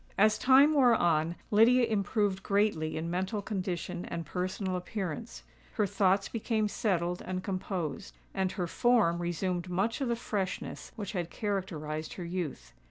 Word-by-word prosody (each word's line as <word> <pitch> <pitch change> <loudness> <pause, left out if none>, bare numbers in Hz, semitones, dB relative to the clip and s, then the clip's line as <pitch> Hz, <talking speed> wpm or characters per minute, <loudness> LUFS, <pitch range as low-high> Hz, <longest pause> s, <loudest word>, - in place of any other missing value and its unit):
As 215 +1 +4
time 275 +4 +6
wore 255 -5 +5
on, 165 -3 +2 0.2
Lydia 235 +4 +6
improved 205 -2 0
greatly 200 -7 +1
in 165 +1 -3
mental 190 +4 -1
condition 185 -3 -3
and 170 -1 -5
personal 185 +3 -2
appearance: 190 +3 -5 0.3
her 210 - +2
thoughts 195 0 +2
became 220 -1 0
settled 180 -4 -1
and 185 0 -4
composed, 175 - -4 0.2
and 190 -1 0
her 180 - -2
form 200 -3 +3
resumed 175 +1 -2
much 195 +9 0
of 270 - 0
the 235 - +1
freshness 205 -5 -4
which 205 -3 -5
had 175 -4 -3
characterised 165 -8 -3
her 180 - -6
youth. 165 - -4
190 Hz, 150 wpm, -30 LUFS, 175-215 Hz, 0.3 s, time